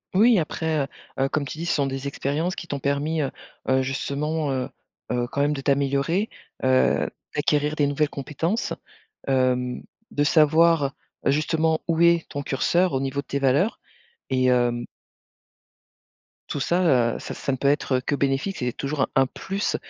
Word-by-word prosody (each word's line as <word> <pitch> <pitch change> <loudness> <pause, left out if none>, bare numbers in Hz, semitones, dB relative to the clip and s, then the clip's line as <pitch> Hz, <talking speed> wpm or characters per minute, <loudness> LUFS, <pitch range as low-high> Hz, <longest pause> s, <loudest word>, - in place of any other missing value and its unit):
Oui, 225 +2 +6
après, 160 -1 0
heu, - - -4 0.4
heu, 135 - +1
comme 150 -1 -1
tu 155 - -7
dis, 170 - -4
ce 170 - +1
sont 140 -2 +1
des 135 +1 -4
expériences 150 +6 -1
qui 170 - -7
t'ont 145 - -3
permis, 145 +3 0
heu, 135 - -2 0.4
heu, 130 0 +3
justement, 140 +3 -2
heu, 130 0 -2 0.4
heu, 120 0 0
quand 140 - 0
même 145 +1 +2
de 135 - -4
t'améliorer, 140 +8 +1 0.3
heu, 130 0 +3 0.2
d'acquérir 150 0 +1
des 145 -2 +2
nouvelles 145 +1 +1
compétences, 160 - -2 0.5
hem, 125 -2 +1 0.3
de 145 - +1
savoir, 155 -1 +4 0.3
heu, - - +5
justement 160 +2 +1
où 165 -1 +1
est 170 -1 +4
ton 145 -1 -4
curseur 170 +5 +1
au 130 - +1
niveau 135 +1 -1
de 140 - -15
tes 140 - -2
valeurs. 140 - +2 0.5
Et 130 -1 +2
hem 120 -1 +2 1.6
Tout 145 - -2
ça, 140 -10 +3
heu, - - -5
ça - - -6
ça - - -3
ne 130 - -1
peut 140 - 0
être, 145 -2 +1
heu, - - -2
que 145 - -1
bénéfique, 140 +8 0
c'est 125 -1 -1
toujours 140 0 -3
un - - +3
un 135 0 +4
plus 195 +8 -3
140 Hz, 180 wpm, -24 LUFS, 135-160 Hz, 1.6 s, Oui